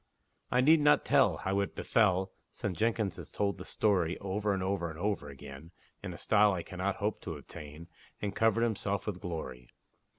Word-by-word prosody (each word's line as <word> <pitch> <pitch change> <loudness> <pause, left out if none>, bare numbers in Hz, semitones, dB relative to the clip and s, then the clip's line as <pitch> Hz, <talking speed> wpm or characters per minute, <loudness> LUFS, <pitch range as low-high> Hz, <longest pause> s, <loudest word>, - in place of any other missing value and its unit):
I 125 - +3
need 155 +5 +6
not 145 0 +4
tell - - +4
How 95 +1 -1
it 100 - -2
befell, 95 -4 +2 0.2
(Since 95 -4 -4
Jenkins 110 -3 0
has - - -9
told 100 -1 -1
the 90 - -7
story 95 -6 +1
Over 100 +2 -1
and 95 -1 -1
over 95 -3 -1
and 80 - -8
over 95 -5 -2
again, 70 +3 -10 0.3
In - - -5
a - - -8
style 105 -1 +4
I 90 -2 -3
cannot 95 +2 -2
hope 105 0 -2
to - - -5
attain, 75 +3 -10 0.3
And 105 -1 -3
covered 115 0 +3
himself 100 -3 -1
with 100 -4 -4
glory!) 65 -8 -6
100 Hz, 190 wpm, -31 LUFS, 85-105 Hz, 0.3 s, need